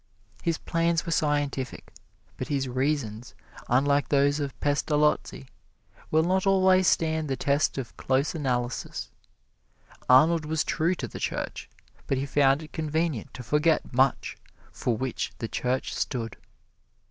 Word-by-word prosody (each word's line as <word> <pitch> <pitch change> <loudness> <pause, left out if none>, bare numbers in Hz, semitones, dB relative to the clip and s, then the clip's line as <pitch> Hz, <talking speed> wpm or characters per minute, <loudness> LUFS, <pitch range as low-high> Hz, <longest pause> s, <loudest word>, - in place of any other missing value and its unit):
His 165 -3 0
plans 165 -1 0
were 170 - -3
scientific, 145 -4 -1 0.4
but - - -5
his 135 -2 -1
reasons, 130 -2 -2 0.3
unlike 140 +3 +2
those 145 +1 +3
of 140 -2 -4
Pestalozzi, 150 -1 +1 0.6
will 160 +1 +3
not 190 +3 +1
always 190 -1 +4
stand 160 -1 +1
the 135 - -1
test 140 +3 +1
of 130 -3 -5
close 135 +3 0
analysis. 125 -6 -3 1.0
Arnold 155 +6 +6
was 160 0 0
true 170 +4 0
to - - -5
the - - -9
Church, - - -4 0.4
but 135 - 0
he 135 - -1
found 140 +1 +3
it 155 - -13
convenient 160 -5 -2
to 125 - -7
forget 150 +5 +1
much 130 +1 +1 0.3
for 120 -3 -1
which 130 0 -3
the 115 - -4
Church 125 +3 -2
stood. 115 -4 -3
145 Hz, 135 wpm, -27 LUFS, 130-160 Hz, 1.0 s, Arnold